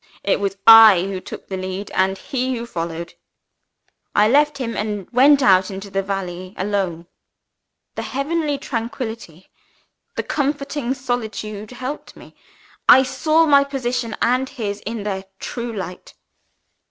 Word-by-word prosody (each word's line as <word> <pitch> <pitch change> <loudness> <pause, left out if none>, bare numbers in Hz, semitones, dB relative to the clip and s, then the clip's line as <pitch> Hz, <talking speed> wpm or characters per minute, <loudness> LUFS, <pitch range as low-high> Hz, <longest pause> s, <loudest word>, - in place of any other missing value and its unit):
It 200 - +1
was 195 -1 -2
I 225 -5 +9
who 195 -1 -4
took - - -9
the 190 - -4
lead, 185 +2 -5
and 190 +1 +1
he 255 +1 -2
who 230 - -5
followed. 170 -4 -5 1.0
I 210 +1 +5
left 290 +4 +3
him 240 -4 -4
and 210 -2 -3
went 275 +3 +5
out 190 -3 +4
into 195 0 -8
the 195 - 0
valley 185 -1 -5
alone. 190 -4 -2 0.9
"The - - -4
heavenly 290 +2 -2
tranquillity, 230 - -6 0.6
the - - -2
comforting 280 -2 -2
solitude 220 -5 -4
helped 255 +3 -7
me. - - -15 0.6
I 265 - +9
saw 310 +5 +2
my 280 -2 +5
position 250 -4 -3
and 255 +2 +1
his, 210 -6 -4
in 225 -2 -4
their 195 -2 -3 0.2
true 235 -1 -5
light. 185 -4 -7
225 Hz, 140 wpm, -20 LUFS, 195-265 Hz, 1.0 s, I